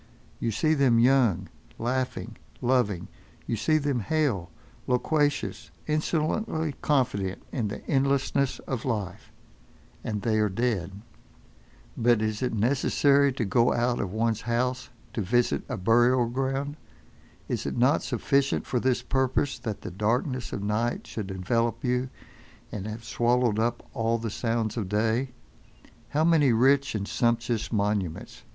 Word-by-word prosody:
You 115 - -1
see 155 +9 +2
them 135 -6 +4
young, 115 -7 +3 0.3
laughing, 130 +2 -2 0.2
loving; 120 -8 +1 0.4
you 115 - -1
see 110 +9 +2
them 145 -4 0
hale, 120 - 0 0.4
loquacious, 145 +3 0 0.2
insolently 155 +1 -1
confident 120 -10 0
in 115 -6 -1
the 105 - -7
endlessness 140 0 +1
of 130 -3 -3
life. 105 -7 -4 0.7
And 105 -2 -3
they 110 -2 +2
are 105 -1 +2
dead. 100 -3 -2 0.9
But 120 -1 +3
is 110 -1 -2
it 125 - 0
necessary 140 +4 +3
to 120 -3 -2
go 115 +4 +3
out 120 0 +1
of 90 - -2
one's 110 +1 0
house 125 +2 -1 0.2
to 110 - -2
visit 120 +5 +1
a - - -2
burial 120 +5 +4
ground? 135 +4 -2 0.7
Is - - -2
it - - -3
not 130 +6 +3
sufficient 140 -1 0
for 125 - 0
this 125 0 +1
purpose, 130 0 0
that 110 -4 -5
the 100 - -5
darkness 120 - -1
of 100 - -4
night 110 +4 -1
should 105 -4 -5
envelop 115 +5 -1
you, 125 0 0 0.6
and 105 0 -5
have 110 +2 -6
swallowed 120 -2 +1
up 120 +1 -1
all 115 -2 +1
the 115 -1 -4
sounds 115 0 -1
of 100 -5 -2
day? 110 +5 +1 0.8
How 150 +4 +1
many 160 -5 +4
rich 135 +3 +3
and 100 -1 -2
sumptuous 115 -1 0
monuments! 100 - -2
120 Hz, 140 wpm, -27 LUFS, 110-135 Hz, 0.9 s, them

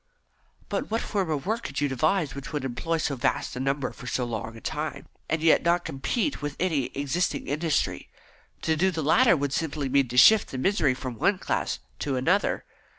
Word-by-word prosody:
"But - - -3
what 225 +1 0
form 195 -5 -1
of 150 -3 -2
work 220 +4 -1
could - - -4
you 145 - +2
devise 155 +4 +1
which 140 0 -7
would 145 -3 -3
employ 165 +6 -1
so 150 -3 -1
vast 130 0 -1
a - - -4
number 135 +1 -1
for 125 - -11
so 125 0 -1
long 115 -1 -5
a - - -9
time, 155 +4 -4 0.2
and 160 0 0
yet 165 - +5
not 175 0 +2
compete 160 - -2
with 145 -1 -4
any 160 -8 +1
existing 145 +6 -1
industry? 155 +2 -1 0.5
To 160 - +2
do 185 +5 +2
the 165 -4 -3
latter 195 - +5
would 140 -1 -2
simply 150 -3 -2
mean 140 0 +3
to 125 +1 -5
shift 215 - +7
the 130 - -5
misery 145 -3 +2
from 125 -3 -6
one 200 -1 +3
class - - -1 0.2
to 135 - -1
another." 170 +11 +1
150 Hz, 205 wpm, -26 LUFS, 135-170 Hz, 0.5 s, shift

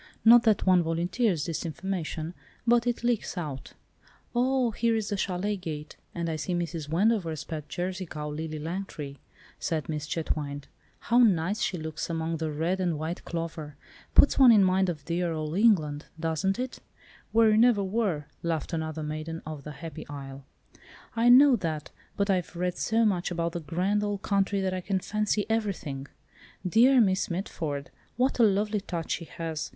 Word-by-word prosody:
Not 235 +1 +9
that 215 -3 +3
one 185 -2 +5
volunteers 170 - 0
this 165 - -3
information, 170 -1 -4 0.3
but 240 0 +3
it 240 0 -1
leaks 240 -5 0
out." 145 -6 -5 0.6
"Oh, 250 0 +2
here 230 +1 +1
is 220 -2 -1
the 205 - -1
châlet 195 +1 -2
gate, 150 -3 -6 0.2
and 170 -1 -2
I 160 -1 -2
see 175 +4 -2
Mrs. 165 -3 -3
Wendover's 170 -4 +1
pet 155 -2 -6
Jersey 180 +3 -3
cow, 150 -1 -5
'Lily 155 +1 -4
Langtry,'" 155 -4 -5 0.4
said 160 -2 -2
Miss 150 -1 -3
Chetwynde. 145 -3 -3 0.3
"How 240 +1 +3
nice 200 -3 +3
she 185 - 0
looks 160 0 -5
among 165 0 -2
the 160 0 -2
red 165 +5 -1
and 175 -4 0
white 160 +3 -4
clover. 165 -3 -5 0.4
Puts 285 - +6
one 260 -3 +9
in 210 -3 +6
mind 185 0 +3
of 150 -5 -5
dear 170 0 -1
old 155 0 -3
England, 165 -9 +3
doesn't 165 +5 0
it?" 255 0 -4 0.5
"Where 225 -1 +5
you 215 - +4
never 230 -3 +5
were," 190 -7 -1 0.2
laughed 165 0 -2
another 160 -1 -3
maiden 155 +2 -5
of 155 -2 -7
the 150 - -7
happy 155 +2 -8
isle. 135 -1 -8 0.7
"I 235 +1 +4
know 265 +2 +8
that, 160 -5 -4 0.3
but 200 - +1
I've 185 -3 0
read 180 +1 -1
so 225 +1 +2
much 185 -4 +1
about 170 -1 -1
the 175 - -4
grand 180 +7 0
old 205 -1 -2
country 200 0 +1
that 190 -1 0
I 185 - -2
can 195 +1 -1
fancy 210 +1 0
everything. 195 -11 -2 0.6
Dear 250 +7 +5
Miss 190 -4 +2
Mitford! 160 -5 -4 0.3
what 255 +1 +1
a - - +7
lovely 210 0 +2
touch 170 -4 -4
she 170 - -2
has! 160 -1 -5
175 Hz, 175 wpm, -28 LUFS, 155-205 Hz, 0.7 s, Not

